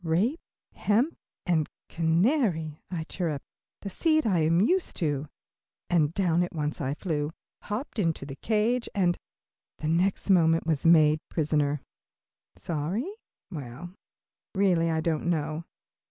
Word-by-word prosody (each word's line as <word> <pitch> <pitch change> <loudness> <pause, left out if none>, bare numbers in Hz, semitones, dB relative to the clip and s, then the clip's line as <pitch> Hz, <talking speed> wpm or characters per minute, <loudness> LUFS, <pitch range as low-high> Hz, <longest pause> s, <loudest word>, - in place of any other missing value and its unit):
"Rape, 195 - +1 0.3
hemp 240 +10 +1 0.3
and 160 -4 +1 0.2
canary," 165 - +1
I 170 -3 -3
chirped, 160 -4 -3 0.4
"the 200 - -4
seed 315 - +2
I 190 -6 +3
am 165 +2 +3
used 355 - +2
to," 145 -3 -1 0.6
and 155 -4 +3
down 175 -3 +2
I - - +3
at 175 - -10
once 150 -1 -2 0.2
flew, 150 -6 -1 0.3
hopped 220 +3 -4
into 165 -7 0
the 135 -1 -7
cage, 230 - +1
and, 180 -3 +3 0.6
the 155 - -4
next 180 +5 +1
moment, 165 -3 +4
was 160 -1 +1
made 155 -2 +6
prisoner. 150 -2 +1 0.8
Sorry? 180 - -2 0.4
Well, 150 +3 -7 0.6
really 180 -4 +3
I 160 -1 +1
don't 160 0 0
know. 155 0 -1
165 Hz, 130 wpm, -28 LUFS, 155-200 Hz, 0.8 s, made